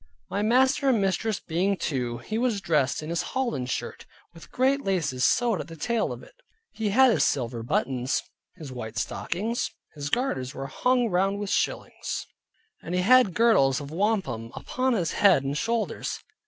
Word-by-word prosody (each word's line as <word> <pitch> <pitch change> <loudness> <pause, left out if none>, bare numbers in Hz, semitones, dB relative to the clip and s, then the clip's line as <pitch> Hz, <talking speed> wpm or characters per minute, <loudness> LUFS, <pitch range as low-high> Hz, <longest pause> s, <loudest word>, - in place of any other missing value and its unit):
My 200 - 0
master 265 +5 +3
and 240 -4 +3
mistress 200 +2 0
being 185 +4 0
two. 125 -7 -2
He 215 - -4
was 235 -4 +1
dressed 155 -6 +1
in 155 - -5
his 170 - 0
holland 235 - -2
shirt, - - -4 0.3
with 165 - -14
great 270 +2 +2
laces 160 -10 0
sewed 235 -8 +2
at 145 - -9
the 165 - -9
tail 230 +9 -1
of - - -7
it; - - -16 0.4
he 220 -2 -2
had 260 +5 +6
his - - +2
silver 120 -3 -1
buttons, 125 +2 -1 0.3
his 155 -7 -9
white 115 -3 -7
stockings, 210 - -2 0.2
his 145 -1 -5
garters 145 - -1
were 135 - -5
hung 250 - +1
round 195 +3 +1
with 205 -1 -4
shillings, - - -2 0.6
and 175 - -4
he 180 - +2
had 245 -2 +5
girdles 165 - +4
of 145 0 -8
wampum 160 - -1
upon 255 0 -1
his 175 -8 0
head 190 -9 +4
and 135 +1 -2
shoulders. 230 +7 -2
190 Hz, 175 wpm, -26 LUFS, 140-230 Hz, 0.6 s, had